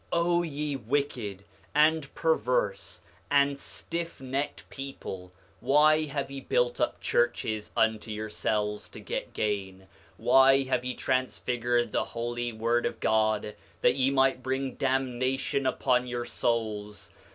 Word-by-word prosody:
8:33 170 - +2
O 175 0 +3
ye 150 -3 -3
wicked 120 -6 -2 0.3
and 155 -1 +3
perverse 120 -10 0 0.3
and 140 0 +4
stiffnecked 140 -2 -4
people, 95 -9 -7 0.3
why 155 +2 +4
have 140 -2 -4
ye 135 0 -6
built 120 -1 +1
up - - 0
churches 110 -3 0
unto 110 0 +1
yourselves 105 -1 -2
to - - -11
get - - -5
gain? 95 -3 -2 0.3
Why 135 +3 +5
have 130 -2 0
ye 125 0 -3
transfigured 120 -2 0
the - - +1
holy 120 +1 -3
word 115 +2 +1
of 115 - -6
God, 110 -1 +1 0.3
that - - +4
ye 135 -1 +3
might 135 -1 +3
bring 130 +1 -2
damnation 130 0 0
upon 125 -1 +1
your 120 -1 -3
souls? 105 -5 -2
125 Hz, 130 wpm, -28 LUFS, 110-135 Hz, 0.3 s, Why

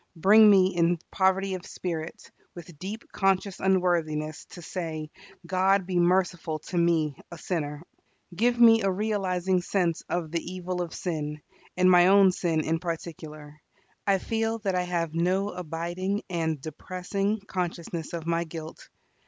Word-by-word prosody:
Bring 210 +6 +7
me 190 -2 +5
in 170 0 +2
poverty 190 0 +1
of 185 -1 -5
Spirit, 165 -3 -6 0.2
with 170 -3 -11
deep 205 +6 -7
conscious 195 0 0
unworthiness, 170 -5 0
to 175 - -12
say, 160 -3 -5 0.3
"God 190 +2 +2
be 180 -1 0
merciful 175 -2 +1
to 175 +4 -6
me 160 -4 +2 0.2
a 170 - -8
sinner." 150 -3 -3 0.5
Give 240 +5 +1
me 225 -1 +7
a 195 - +1
realizing 190 -2 0
sense 175 -3 0
of 170 -3 -2
the 170 -1 -1
evil 180 0 -4
of 170 -2 -5
sin, 150 -4 -3 0.4
and 185 0 +5
my 175 0 +7
own 195 0 +6
sin 170 -3 0
in 160 +1 -1
particular. 155 -3 -7 0.5
I 195 -1 +4
feel 225 +3 -1
that 195 -2 0
I 180 - +1
have 170 -3 -2
no 185 +4 +1
abiding 180 +3 -3
and 160 -3 -1
depressing 185 +7 -3
consciousness 175 -4 -4
of 165 -2 -4
my 170 0 0
guilt. 160 -1 -9
180 Hz, 150 wpm, -27 LUFS, 165-190 Hz, 0.5 s, Bring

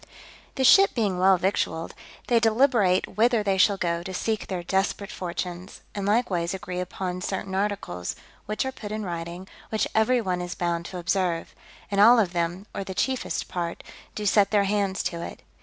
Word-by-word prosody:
The 265 - 0
ship 390 +9 +7
being 205 -6 0
well 190 0 +5
victualled, 170 -3 -1 0.3
they 235 -1 +3
deliberate 225 -6 +2
whither 230 0 +3
they 195 -2 +1
shall 200 +1 +5
go 170 -2 -1
to 185 +1 -6
seek 220 +3 -2
their 180 -2 -3
desperate 195 +2 -1
fortunes, 180 +1 -5
and 200 -1 -3
likewise 195 -6 +1
agree 180 -1 -5
upon 180 0 -4
certain 190 0 -3
articles, 195 - -2 0.3
which 215 +4 -1
are 265 - -2
put 210 -5 -8
in 215 -1 -3
writing, 170 +1 -5 0.2
which 220 - 0
every 220 +3 +3
one 185 -5 -1
is 175 -1 -5
bound 170 -1 -1
to 185 - -7
observe; 175 -1 -1 0.4
and 200 0 +3
all 235 +4 +8
of 195 -6 +2
them, 175 +3 -2
or - - -3
the 190 -1 -7
chiefest 260 +4 -1
part, 170 -1 -4 0.3
do 210 - -4
set 205 0 +4
their 205 -2 +3
hands 200 -1 0
to 170 -1 -3
it. - - -8
190 Hz, 185 wpm, -26 LUFS, 180-210 Hz, 0.4 s, all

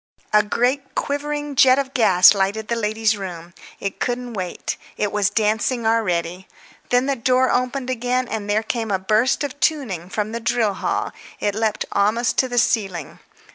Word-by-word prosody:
A 210 - +7
great 255 +6 -1
quivering 290 0 -3
jet 255 0 +6
of 275 -1 -2
gas 185 -7 +6
lighted 200 +2 -1
the 235 - +1
ladies' 220 -1 0
room. 175 -4 -8 0.3
It 195 - -4
couldn't 245 0 -3
wait; 185 -4 -4 0.2
it 205 - -1
was 205 -1 +1
dancing 220 +2 0
already. 185 -5 0 0.4
When 245 +1 +3
the 275 0 0
door 255 +1 +2
opened 255 +1 -1
again 250 +1 -1
and 210 -2 -4
there 215 +2 +1
came 225 0 -3
a 195 - +1
burst 215 +9 +1
of 285 0 -5
tuning 215 - -1
from 210 +1 -2
the 230 - -3
drill 225 -2 +1
hall, - - -2 0.3
it 205 - 0
leaped 220 0 -1
almost 215 +4 +1
to 260 - +3
the 245 -1 -4
ceiling. 195 - 0
225 Hz, 175 wpm, -21 LUFS, 205-255 Hz, 0.4 s, A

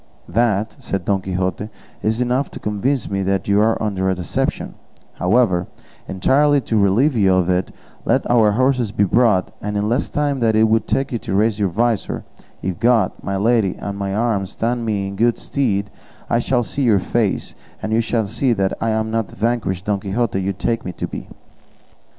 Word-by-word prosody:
"That," 110 +1 0
said 95 -3 -4
Don 100 -2 +1
Quixote, 95 +2 -2 0.3
"is 110 +3 0
enough 125 +3 0
to - - -9
convince 105 +5 -1
me 100 0 -2
that 95 -1 -1
you 100 +1 +3
are 110 +1 +2
under 95 -3 -1
a 95 - +1
deception; 90 -3 -2 0.4
however, 90 -2 +2 0.4
entirely 145 +9 +3
to 115 - -2
relieve 115 +9 +3
you 100 -4 +4
of 90 -1 +2
it, 90 0 0 0.3
let - - +1
our 110 -4 +4
horses 125 -2 +1
be 105 -1 +1
brought, 105 -2 +2
and 105 0 -3
in 105 +1 0
less 120 +5 0
time 145 -2 0
than 115 -2 +2
it 110 - +5
would 110 +1 +1
take 135 - 0
you 120 - -2
to 95 - -3
raise 110 +1 +2
your 100 -2 +1
visor, 115 +3 -1 0.4
if 95 -2 -3
God, 115 -5 +3
my 100 0 -2
lady, 110 -2 +2
and 100 -1 -5
my 100 -1 -3
arm 105 -4 0
stand 115 +3 -2
me 100 -2 -1
in 100 - -6
good 115 +3 +2
stead, 105 -7 -1 0.4
I 115 - +3
shall 120 0 +1
see 140 - -4
your 115 -6 +4
face, 105 +2 -1 0.3
and 110 - -2
you 115 - +3
shall 115 -1 0
see 120 +5 0
that 95 -3 0
I 115 - +1
am 110 0 -1
not 115 -1 0
the - - -14
vanquished 105 -5 -1
Don 105 -1 0
Quixote 100 +1 -1
you 95 +1 -1
take 115 +3 -2
me 90 - -5
to - - -4
be." - - -7
110 Hz, 200 wpm, -20 LUFS, 95-120 Hz, 0.4 s, it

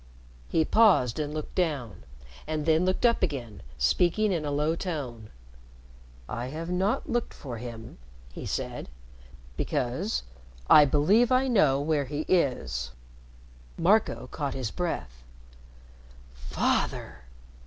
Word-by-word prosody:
He 160 - +2
paused 180 - +4
and 150 -1 -2
looked 155 0 -5
down, 145 - -2 0.4
and 155 -1 -2
then 160 +2 +3
looked 185 +6 +1
up 235 -1 +3
again, 120 - -3 0.2
speaking 175 - +2
in 170 -4 -1
a 150 - -2
low 150 +3 +1
tone. 135 - -5 1.0
"I 120 +1 -4
have 165 +5 -5
not 190 +4 0
looked 240 -1 -2
for 120 -5 -7
him," 115 - -9 0.3
he - - -7
said, - - -4 0.7
"because 145 - -1 0.4
I 150 - +8
believe 185 - +3
I 255 +1 +3
know 155 - +4
where 145 -1 0
he 145 +3 -3
is." 95 - 0 0.9
Marco 200 +6 +2
caught 140 -3 -3
his 130 -5 -3
breath. 60 - -4 1.1
"Father!" - - -1
150 Hz, 120 wpm, -27 LUFS, 125-180 Hz, 1.1 s, I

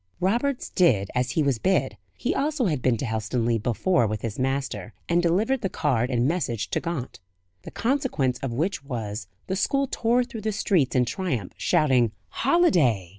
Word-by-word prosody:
Roberts 240 +8 0
did 110 - +3
as 125 0 0
he 155 - +1
was 135 -5 +1
bid 190 - +1 0.2
he - - -1
also 290 -2 0
had 150 -9 0
been 125 -2 +2
to 135 - -3
Helstonleigh 115 +1 -1
before 120 - +2
with 105 0 -4
his 115 -1 -4
master 130 -6 -2
and 170 +1 +3
delivered 210 +10 +1
the 195 - -1
card 125 -8 0
and 125 -1 +1
message 120 - -1
to - - +1
Gaunt. 165 -7 -5 0.4
The - - -9
consequence 235 - 0
of 135 - -3
which 160 +7 -1
was, 110 -6 -5 0.2
the 190 - -2
school 275 +7 +1
tore 245 -1 +1
through 235 -3 -8
the 215 0 -1
streets 175 -10 +1
in 125 -1 +4
triumph, 125 - -3
shouting 125 -7 +2 0.2
"Holiday!" 175 - +2
140 Hz, 175 wpm, -25 LUFS, 115-195 Hz, 0.4 s, in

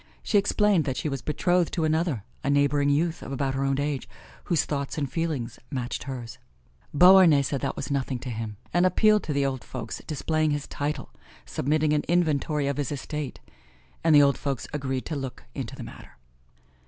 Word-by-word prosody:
She 205 - +3
explained 205 -3 +2
that 135 -2 -2
she 155 - -1
was 135 -3 -3
betrothed 165 +6 +1
to 165 - 0
another, 155 - 0 0.2
a - - 0
neighboring 145 0 +3
youth 160 +4 +1
of - - -7
about 135 0 -1
her 135 +1 -1
own 135 0 +1
age, 140 -3 -2 0.4
whose 170 -4 +1
thoughts 140 +1 -3
and 145 -2 0
feelings 155 -5 -3
matched 130 -4 -4
hers. 125 -4 -7 0.5
Beauharnais 180 -3 +7
said 135 0 -2
that 140 0 -2
was - - -5
nothing 135 -2 -1
to 125 +1 -6
him, 110 -2 -5 0.2
and 175 +1 +4
appealed 215 +3 +4
to - - -3
the 140 -1 +1
old 130 -2 -2
folks, 120 -4 -6
displaying 155 +1 0
his 145 -1 -1
title, 145 +1 -4 0.3
submitting 150 +2 +1
an 150 - +2
inventory 155 -4 +1
of 140 -1 -1
his 145 -2 -2
estate; 145 -1 -5 0.6
and 160 -2 +5
the 145 - +8
old 140 -1 +2
folks 140 -3 -2
agreed 135 -3 -2
to 160 - -3
look 135 -3 -5
into 130 -5 -5
the - - -7
matter. - - -12
145 Hz, 190 wpm, -26 LUFS, 135-155 Hz, 0.6 s, the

